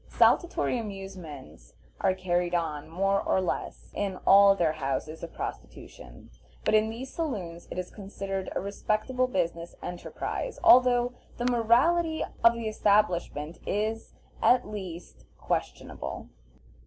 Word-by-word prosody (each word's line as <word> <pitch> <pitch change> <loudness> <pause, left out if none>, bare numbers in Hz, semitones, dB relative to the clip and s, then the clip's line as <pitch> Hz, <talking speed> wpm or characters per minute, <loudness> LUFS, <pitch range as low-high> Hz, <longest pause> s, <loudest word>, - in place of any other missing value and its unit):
Saltatory 345 -7 +3
amusements 180 - -9 0.2
are 190 - +2
carried 175 -1 0
on, 155 -4 -2
more 195 +4 +1
or - - +1
less, 185 - -4
in 195 -2 -2
all 200 0 +8
their 170 -5 +2
houses 155 +1 -3
of 170 - -7
prostitution, - - -9 0.3
but - - +2
in 215 0 +4
these 245 +4 -7
saloons 190 - -4
it - - -7
is 185 0 -4
considered 195 -1 -5
a - - +1
respectable 215 +5 -1
business 170 -6 -2
enterprise, 180 - -4
although 245 0 +6 0.2
the 240 - -2
morality 260 +8 +3 0.2
of 230 0 +8
the 230 -1 -4
establishments 180 -7 +1
is, 215 +2 -2 0.3
at 250 -2 +4
least, 180 - -8
questionable. - - -4
195 Hz, 125 wpm, -28 LUFS, 175-230 Hz, 0.3 s, all